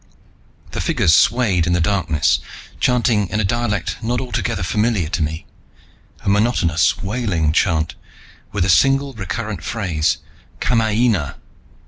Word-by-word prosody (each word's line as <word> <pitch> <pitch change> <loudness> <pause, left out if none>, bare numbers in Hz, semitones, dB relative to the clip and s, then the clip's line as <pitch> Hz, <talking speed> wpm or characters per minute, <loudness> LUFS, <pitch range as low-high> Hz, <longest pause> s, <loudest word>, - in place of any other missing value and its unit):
The - - -3
figures 80 - +2
swayed 100 -5 +3
in 85 - +1
the 90 - +2
darkness, 85 -4 +1 0.4
chanting 120 -5 +2
in 105 - -1
a - - +1
dialect 105 0 -1
not 120 +2 -1
altogether 110 -7 -2
familiar 105 -3 0
to 90 - -2
me, 80 +1 -3 0.8
a - - -10
monotonous 100 -6 +2
wailing 95 -8 0
chant, 80 0 +1 0.6
with 100 -3 0
a - - 0
single 135 - +3
recurrent 100 -2 -5
phrase: 90 -10 -1 0.4
"Kamaina! 110 - +1
100 Hz, 125 wpm, -19 LUFS, 85-115 Hz, 0.8 s, swayed